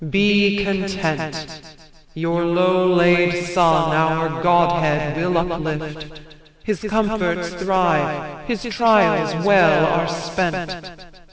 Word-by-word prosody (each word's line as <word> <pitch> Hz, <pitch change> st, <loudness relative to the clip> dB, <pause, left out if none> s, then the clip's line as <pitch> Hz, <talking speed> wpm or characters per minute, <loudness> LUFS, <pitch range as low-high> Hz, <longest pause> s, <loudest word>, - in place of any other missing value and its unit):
Be 205 Hz, +2 st, +2 dB
content; 160 Hz, -5 st, -4 dB, 0.5 s
Your 165 Hz, +1 st, -2 dB
low 185 Hz, +2 st, +2 dB
laid 175 Hz, 0 st, +3 dB
son 165 Hz, -3 st, +2 dB
our 160 Hz, 0 st, 0 dB
godhead 170 Hz, -4 st, +1 dB
will 175 Hz, +2 st, -1 dB
uplift; 160 Hz, -2 st, -5 dB, 0.4 s
His 210 Hz, -5 st, -3 dB
comforts 205 Hz, -5 st, -2 dB
thrive, 160 Hz, -5 st, -2 dB
his 235 Hz, -5 st, -4 dB
trials 215 Hz, -8 st, +1 dB
well 175 Hz, -6 st, +4 dB
are 165 Hz, +1 st, 0 dB
spent. 175 Hz, +1 st, -5 dB
175 Hz, 95 wpm, -19 LUFS, 160-190 Hz, 0.5 s, well